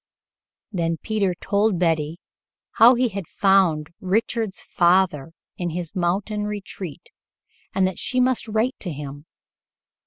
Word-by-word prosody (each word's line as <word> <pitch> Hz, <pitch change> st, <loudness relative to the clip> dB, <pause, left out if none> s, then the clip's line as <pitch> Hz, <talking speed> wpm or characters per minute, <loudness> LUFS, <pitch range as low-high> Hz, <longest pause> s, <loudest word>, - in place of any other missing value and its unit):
Then 165 Hz, -4 st, -1 dB
Peter 205 Hz, -5 st, 0 dB
told 205 Hz, -1 st, +1 dB
Betty 165 Hz, -1 st, 0 dB, 0.6 s
how 240 Hz, +3 st, +9 dB
he 245 Hz, 0 st, +2 dB
had 195 Hz, -5 st, -6 dB
found 180 Hz, -6 st, +2 dB
Richard's 215 Hz, +2 st, -1 dB
father 175 Hz, -5 st, +2 dB, 0.3 s
in 175 Hz, -1 st, -2 dB
his 170 Hz, 0 st, -5 dB
mountain 195 Hz, +4 st, -1 dB
retreat 195 Hz, -6 st, -7 dB, 0.6 s
and 190 Hz, -, +3 dB
that 185 Hz, -2 st, -2 dB
she 255 Hz, -, 0 dB
must 250 Hz, -2 st, +2 dB
write 220 Hz, +4 st, 0 dB
to 180 Hz, -, -3 dB
him. 145 Hz, +1 st, -8 dB
190 Hz, 125 wpm, -23 LUFS, 165-210 Hz, 0.6 s, how